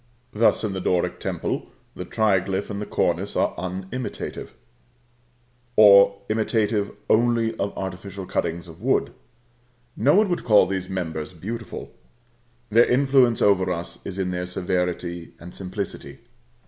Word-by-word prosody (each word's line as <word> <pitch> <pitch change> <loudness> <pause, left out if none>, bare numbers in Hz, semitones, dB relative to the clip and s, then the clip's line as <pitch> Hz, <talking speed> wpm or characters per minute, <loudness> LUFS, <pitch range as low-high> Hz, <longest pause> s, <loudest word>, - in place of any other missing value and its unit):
Thus, 110 +2 +3
in 105 -3 -1
the 95 - -4
Doric 90 -1 0
temple, - - -3 0.3
the - - -6
triglyph 100 -2 0
and 105 +1 -5
cornice - - 0
are - - +1
unimitative; 95 +7 -5 1.2
or 100 -1 +7
imitative 110 -1 0 0.2
only 115 0 +2
of 100 0 -1
artificial 95 +1 -6
cuttings 85 -1 -2
of 80 -1 -13
wood. - - +1 0.8
No 140 +8 +3
one 210 +1 +5
would 175 - -1
call 105 -3 +6
these 95 0 -3
members 85 -3 -4
beautiful. 115 +7 -7 0.8
Their 115 +3 +6
influence 130 -2 +3
over 95 -2 +3
us 85 -1 -5
is 90 - -6
in 95 -1 -1
their 90 0 -3
severity 90 -2 -3
and 85 +1 -11
simplicity. 95 +1 -6
100 Hz, 130 wpm, -24 LUFS, 90-110 Hz, 1.2 s, or